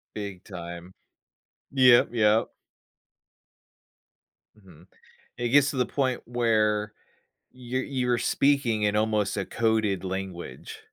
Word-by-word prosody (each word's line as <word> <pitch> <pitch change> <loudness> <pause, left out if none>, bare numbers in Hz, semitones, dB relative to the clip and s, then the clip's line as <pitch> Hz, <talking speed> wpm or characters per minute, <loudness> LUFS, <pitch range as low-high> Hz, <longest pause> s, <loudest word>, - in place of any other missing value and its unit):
Big 100 -3 -6
time, 85 -1 -9 0.8
yep, 130 -3 +6
yep. 110 -1 +2 2.1
Mhm. 90 -3 -18 0.5
It 120 -1 -2
gets 145 +2 +4
to 135 - -6
the 125 - +2
point 130 -3 -1
where 110 -3 0 0.6
you're 130 +1 -4
you're 125 -3 -2
were 120 - +2
speaking 125 -6 +1
in 105 0 +1
almost 105 -1 0
a 95 - -2
coded 110 -5 0
language. 95 -2 -6
110 Hz, 110 wpm, -26 LUFS, 100-125 Hz, 2.1 s, yep